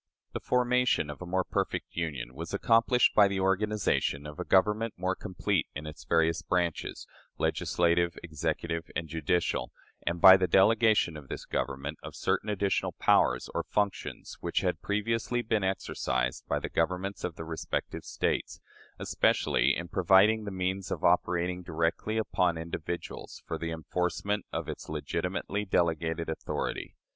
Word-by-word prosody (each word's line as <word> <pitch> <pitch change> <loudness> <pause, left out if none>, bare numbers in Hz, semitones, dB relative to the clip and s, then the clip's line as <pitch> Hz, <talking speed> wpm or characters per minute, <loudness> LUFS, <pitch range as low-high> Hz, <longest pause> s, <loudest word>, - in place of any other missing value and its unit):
" - - -51
The - - -3
formation 125 -9 +2
of 75 - -11
a 90 - -6
"more 95 +1 +1
perfect - - -3
union" 75 -7 -3
was 85 +7 -5
accomplished 115 +4 +4
by 105 -2 +6
the 100 -1 -2
organization 95 -6 +1
of 75 0 -9
a - - -1
government 105 +4 +2
more 95 +1 0
complete 95 -2 -1
in 75 +2 -5
its 75 0 -9
various 80 0 +2
branches, 85 -3 -1 0.3
legislative, 85 0 +1
executive, 85 +1 -3
and 80 - -2
judicial, 80 +2 -1 0.4
and 85 0 0
by 95 +2 +10
the 95 -1 +1
delegation 105 0 +4
to 75 - -8
this 70 - -7
Government 70 +3 -3
of - - -9
certain 95 +3 -1
additional 100 -1 0
powers 60 0 +3
or - - 0
functions 100 -1 -3
which - - -1
had - - -1
previously 115 +3 -1
been 110 -3 0
exercised 60 -9 -1
by - - 0
the - - -3
Governments 90 +4 -1
of 90 -3 -3
the 80 - -7
respective 80 0 -4
States - - -2 0.4
especially 70 +3 +2
in 85 - -5
providing 95 +5 +4
the - - -3
means 95 0 -2
of - - -4
operating 90 +1 +2
directly 85 +5 -1
upon 90 -6 +1
individuals 85 +1 -6
for - - -4
the 85 - -3
enforcement 90 +5 -2
of - - -3
its - - -7
legitimately 100 +2 -2
delegated 85 -3 0
authority. 80 - -4
90 Hz, 150 wpm, -29 LUFS, 80-100 Hz, 0.4 s, by